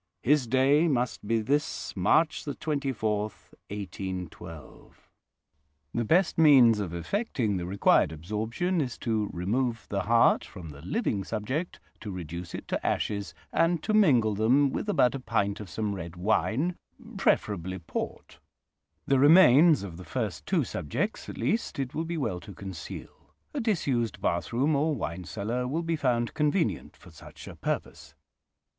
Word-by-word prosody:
His 140 Hz, -1 st, +3 dB
day 135 Hz, +6 st, +4 dB
must 125 Hz, -7 st, -1 dB
be 115 Hz, 0 st, +2 dB
this 145 Hz, +7 st, -1 dB
March 150 Hz, -, +2 dB
24, 135 Hz, -8 st, -1 dB, 0.5 s
1812. 95 Hz, -5 st, -8 dB, 0.9 s
"The 120 Hz, -, 0 dB
best 170 Hz, -, +2 dB
means 130 Hz, -8 st, +7 dB
of 95 Hz, -5 st, -3 dB
effecting 110 Hz, -, -1 dB
the 90 Hz, -1 st, -4 dB
required 95 Hz, -4 st, +3 dB
absorption 110 Hz, -, -2 dB
is 125 Hz, -5 st, -3 dB
to 110 Hz, -3 st, -1 dB
remove 115 Hz, +6 st, -1 dB
the 100 Hz, -1 st, -1 dB
heart 115 Hz, +2 st, +4 dB
from 90 Hz, -5 st, -10 dB
the 70 Hz, -1 st, -11 dB
living 100 Hz, -, -1 dB
subject, 130 Hz, -, -3 dB, 0.2 s
to 105 Hz, -, -7 dB
reduce 85 Hz, -2 st, -6 dB
it -, -, -8 dB
to -, -, -2 dB
ashes, 100 Hz, -6 st, -2 dB, 0.2 s
and 165 Hz, 0 st, +2 dB
to 215 Hz, -, -1 dB
mingle 130 Hz, -, +4 dB
them 130 Hz, +7 st, +3 dB
with 210 Hz, -, -3 dB
about 125 Hz, -11 st, +3 dB
a 135 Hz, -, -4 dB
pint 100 Hz, -5 st, -1 dB
of 105 Hz, -3 st, -8 dB
some 105 Hz, +5 st, -2 dB
red 85 Hz, -3 st, -7 dB
wine, 110 Hz, -, 0 dB, 0.4 s
preferably 95 Hz, -2 st, 0 dB
port. 85 Hz, -, -6 dB, 0.7 s
The 135 Hz, -1 st, +3 dB
remains 150 Hz, -, +7 dB
of 90 Hz, -4 st, -7 dB
the 90 Hz, -, -9 dB
first 110 Hz, -3 st, -4 dB
two 180 Hz, -6 st, +2 dB
subjects, 125 Hz, -, -3 dB
at -, -, -7 dB
least, 230 Hz, -, -1 dB
it 135 Hz, -2 st, -3 dB
will 160 Hz, -, -2 dB
be 170 Hz, 0 st, -3 dB
well 110 Hz, -, -2 dB
to 100 Hz, 0 st, -11 dB
conceal: 95 Hz, -4 st, -9 dB, 0.2 s
a 290 Hz, -, -2 dB
disused 140 Hz, -, 0 dB
bathroom 115 Hz, -, 0 dB
or 150 Hz, +2 st, +1 dB
wine 90 Hz, -6 st, -4 dB
cellar 115 Hz, +7 st, -3 dB
will 160 Hz, +6 st, -2 dB
be 165 Hz, 0 st, 0 dB
found 125 Hz, -6 st, 0 dB
convenient 150 Hz, +4 st, 0 dB
for -, -, -16 dB
such -, -, -13 dB
a -, -, -9 dB
purpose. 75 Hz, -1 st, -4 dB
115 Hz, 150 wpm, -28 LUFS, 100-150 Hz, 0.9 s, means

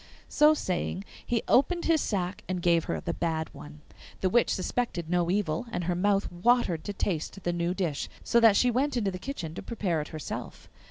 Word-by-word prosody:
So 300 Hz, +1 st, +5 dB
saying, 185 Hz, -, -2 dB, 0.2 s
he 235 Hz, -2 st, -1 dB
opened 340 Hz, +7 st, +3 dB
his 325 Hz, -3 st, +3 dB
sack 185 Hz, -3 st, -2 dB
and 185 Hz, -1 st, -1 dB
gave 170 Hz, -2 st, +3 dB
her -, -, -2 dB
the 170 Hz, 0 st, -3 dB
bad 160 Hz, -2 st, -2 dB
one. 150 Hz, 0 st, -11 dB, 0.4 s
The 185 Hz, -, +1 dB
witch 240 Hz, 0 st, +4 dB
suspected 185 Hz, -4 st, -2 dB
no 175 Hz, -1 st, +2 dB
evil, 185 Hz, +1 st, 0 dB
and 180 Hz, -, -2 dB
her 175 Hz, +1 st, 0 dB
mouth 200 Hz, +3 st, +1 dB
watered 180 Hz, -3 st, +2 dB
to 205 Hz, -, -3 dB
taste 190 Hz, 0 st, -3 dB
the 175 Hz, -, 0 dB
new 175 Hz, +1 st, -1 dB
dish, 170 Hz, -7 st, -2 dB
so 235 Hz, -, +3 dB
that 225 Hz, -3 st, +6 dB
she 245 Hz, +4 st, +4 dB
went 260 Hz, +2 st, 0 dB
into 205 Hz, -4 st, 0 dB
the 185 Hz, -, -6 dB
kitchen 180 Hz, -, -5 dB
to -, -, -6 dB
prepare 190 Hz, -9 st, -1 dB
it 150 Hz, -, -6 dB
herself. 155 Hz, -1 st, -7 dB
185 Hz, 205 wpm, -28 LUFS, 170-235 Hz, 0.4 s, that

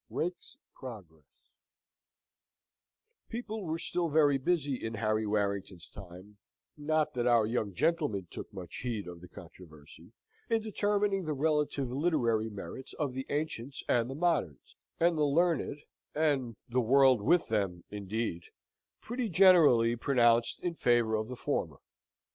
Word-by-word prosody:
Rake's 175 Hz, +1 st, -4 dB, 0.2 s
Progress 90 Hz, -, -13 dB, 1.7 s
People 220 Hz, -2 st, -5 dB
were 160 Hz, 0 st, -2 dB
still 175 Hz, 0 st, -2 dB
very 145 Hz, -2 st, +3 dB
busy 145 Hz, -3 st, -1 dB
in 110 Hz, 0 st, -3 dB
Harry 110 Hz, 0 st, 0 dB
Warrington's 100 Hz, -4 st, -2 dB
time 95 Hz, +2 st, -13 dB, 0.4 s
(not 155 Hz, 0 st, 0 dB
that 125 Hz, -2 st, -1 dB
our 120 Hz, -3 st, +4 dB
young 110 Hz, -4 st, -2 dB
gentleman 150 Hz, -, 0 dB
took -, -, -8 dB
much 95 Hz, -4 st, -8 dB
heed 115 Hz, -6 st, -4 dB
of 85 Hz, -1 st, -9 dB
the 90 Hz, -, -11 dB
controversy) 85 Hz, -5 st, -14 dB, 0.4 s
in 225 Hz, -1 st, +1 dB
determining 205 Hz, -2 st, 0 dB
the 155 Hz, -, -1 dB
relative 150 Hz, -3 st, 0 dB
literary 125 Hz, -7 st, +1 dB
merits 110 Hz, +5 st, -8 dB
of 145 Hz, -4 st, -3 dB
the 130 Hz, +1 st, -5 dB
ancients 145 Hz, -3 st, -4 dB
and 120 Hz, 0 st, +2 dB
the 135 Hz, -, -5 dB
moderns; 150 Hz, -, -1 dB, 0.2 s
and 170 Hz, -1 st, +2 dB
the -, -, +3 dB
learned, 150 Hz, -1 st, +1 dB, 0.3 s
and 140 Hz, -7 st, 0 dB
the 125 Hz, +1 st, +1 dB
world 130 Hz, 0 st, +5 dB
with 170 Hz, +11 st, +2 dB
them, 95 Hz, -6 st, -1 dB
indeed, 105 Hz, -3 st, -3 dB, 0.6 s
pretty 240 Hz, -1 st, -3 dB
generally 160 Hz, -11 st, +6 dB
pronounced 120 Hz, -2 st, +2 dB
in 175 Hz, -, -1 dB
favour 120 Hz, -7 st, +2 dB
of 110 Hz, 0 st, -1 dB
the 125 Hz, -, -6 dB
former. -, -, -2 dB
125 Hz, 135 wpm, -31 LUFS, 105-155 Hz, 1.7 s, generally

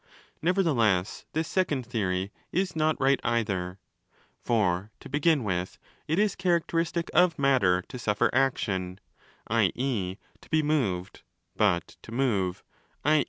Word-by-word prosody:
Nevertheless 135 Hz, -, +1 dB
this 160 Hz, +1 st, -1 dB
second 150 Hz, -9 st, 0 dB
theory 100 Hz, -5 st, -1 dB, 0.2 s
is 185 Hz, -1 st, 0 dB
not 155 Hz, -1 st, +1 dB
right 135 Hz, 0 st, +3 dB
either. 95 Hz, -6 st, -1 dB, 0.2 s
) -, -, -40 dB
| -, -, -36 dB
For, 100 Hz, -4 st, +1 dB
to -, -, -11 dB
begin 150 Hz, -1 st, +2 dB
with, 95 Hz, -3 st, -2 dB, 0.3 s
it 160 Hz, -, 0 dB
is 210 Hz, -1 st, +2 dB
characteristic 170 Hz, -2 st, 0 dB
of 175 Hz, -2 st, +4 dB
matter 115 Hz, -11 st, +3 dB
to 125 Hz, -, -9 dB
suffer 105 Hz, -3 st, +1 dB
30 -, -, -6 dB
action, 95 Hz, -8 st, 0 dB, 0.5 s
i.e. 105 Hz, -8 st, 0 dB, 0.2 s
to -, -, -18 dB
be 155 Hz, 0 st, +2 dB
moved: 110 Hz, -13 st, -1 dB, 0.3 s
but 95 Hz, -5 st, +1 dB
to -, -, -12 dB
move, 105 Hz, -8 st, 0 dB, 0.4 s
i. 155 Hz, +1 st, +5 dB
125 Hz, 140 wpm, -27 LUFS, 95-155 Hz, 0.5 s, i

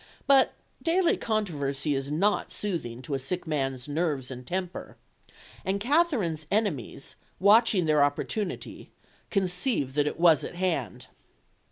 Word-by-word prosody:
But 275 Hz, -2 st, +5 dB, 0.3 s
daily 340 Hz, +2 st, +2 dB
controversy 150 Hz, -10 st, -1 dB
is 135 Hz, +1 st, -2 dB
not 200 Hz, +7 st, +1 dB
soothing 130 Hz, -, -4 dB
to 150 Hz, -, -5 dB
a 135 Hz, -, 0 dB
sick 180 Hz, +7 st, -3 dB
man's 135 Hz, -5 st, -2 dB
nerves 145 Hz, -4 st, -1 dB
and 125 Hz, -1 st, -8 dB
temper, 180 Hz, +2 st, -4 dB, 0.7 s
and 195 Hz, +1 st, -1 dB
Katherine's 225 Hz, -, +1 dB
enemies, 190 Hz, -, -2 dB, 0.2 s
watching 205 Hz, -2 st, +5 dB
their 150 Hz, -2 st, +4 dB
opportunity, 175 Hz, +7 st, -3 dB, 0.4 s
conceived 180 Hz, -, 0 dB
that 145 Hz, 0 st, +1 dB
it 150 Hz, -, -4 dB
was 165 Hz, -5 st, +5 dB
at -, -, -6 dB
hand. 175 Hz, -, -2 dB
170 Hz, 130 wpm, -27 LUFS, 140-205 Hz, 0.7 s, But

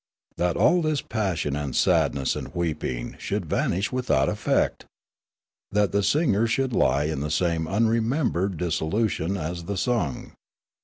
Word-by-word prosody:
That 90 Hz, 0 st, 0 dB
all 180 Hz, -, +4 dB
this 155 Hz, -3 st, 0 dB
passion 95 Hz, -10 st, -1 dB
and 70 Hz, -3 st, -3 dB
sad -, -, +3 dB
ness 70 Hz, -2 st, -1 dB
and -, -, -7 dB
weeping 75 Hz, -8 st, -3 dB
should -, -, -2 dB
vanish 95 Hz, +5 st, 0 dB
without 125 Hz, -, +1 dB
effect! -, -, 0 dB, 0.8 s
That 105 Hz, -2 st, +2 dB
the 100 Hz, -, +2 dB
singer 115 Hz, -, +2 dB
should 130 Hz, +2 st, 0 dB
lie 70 Hz, -, +3 dB
in 75 Hz, -2 st, -2 dB
the 75 Hz, +2 st, -2 dB
same 80 Hz, 0 st, 0 dB
unremembered 110 Hz, -, +1 dB
disso 80 Hz, -2 st, -1 dB
lution 100 Hz, -4 st, 0 dB
as 85 Hz, +1 st, -4 dB
the 100 Hz, +2 st, -3 dB
sung 95 Hz, -, -1 dB
95 Hz, 150 wpm, -25 LUFS, 80-115 Hz, 0.8 s, all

